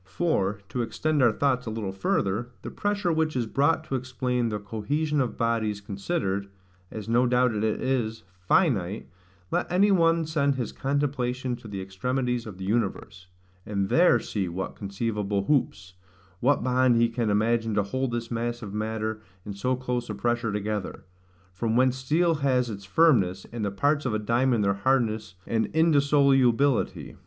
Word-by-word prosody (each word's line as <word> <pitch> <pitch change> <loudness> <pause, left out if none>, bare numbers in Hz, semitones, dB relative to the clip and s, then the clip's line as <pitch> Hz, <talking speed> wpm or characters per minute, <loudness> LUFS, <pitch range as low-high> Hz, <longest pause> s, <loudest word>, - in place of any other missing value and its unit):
For, 105 - 0
to 125 - -2
extend 145 +6 0
our 120 -3 +5
thoughts 125 0 0
a - - -1
little 110 -3 -3
further, 100 +4 -1
the - - -6
pressure 205 -4 -1
which 155 -1 0
is 125 -2 0
brought 145 +8 +1
to 145 - -7
explain 125 -2 -1
the 105 - -2
cohesion 140 +9 -1
of 125 - -3
bodies 115 -3 0
[*dropped 100 - -24
line] 100 - -3
considered, 100 - -2 0.4
as 110 -1 -7
no 120 +2 +3
doubt 125 -1 +3
it 105 0 -2
is, 110 0 -1 0.2
finite, 100 - +1 0.4
let - - -1
any 200 +3 +4
one 165 -3 +3
send 140 -3 +1
his 125 -4 -3
contemplation 130 -3 -1
to 115 - -12
the 100 -2 -5
extremities 125 +5 -2
of 100 -4 -8
the 95 - -6
universe, 95 -3 -2 0.4
and 100 -1 -2
there 170 -8 +5
see 100 -4 -3
what 95 +3 -5
conceivable 100 -1 -2
hoops, 100 -10 0 0.5
what 135 +1 +2
bond 125 -1 +3
he 115 0 +4
can 115 -1 -2
imagine 110 +1 +1
to 105 - +2
hold 130 +6 -2
this 120 0 -4
mass 120 0 -3
of 100 -2 -7
matter 110 0 -3 0.2
in 105 - -5
so 125 +6 -1
close 125 -2 -3
a 105 - -3
pressure 115 +2 -1
together; 105 -1 -3 0.5
from 110 +4 -1
whence 130 +1 +3
steel 160 +6 +2
has 125 -3 +1
its 100 -1 -8
firmness, 95 - +3
and 115 -2 -3
the 100 - 0
parts 145 +8 0
of 110 - -1
a - - +2
diamond 115 +1 +1
their 100 0 +2
hardness 110 -2 0
and 110 -1 0
indissolubility. 140 -5 +3
120 Hz, 175 wpm, -26 LUFS, 105-135 Hz, 0.5 s, our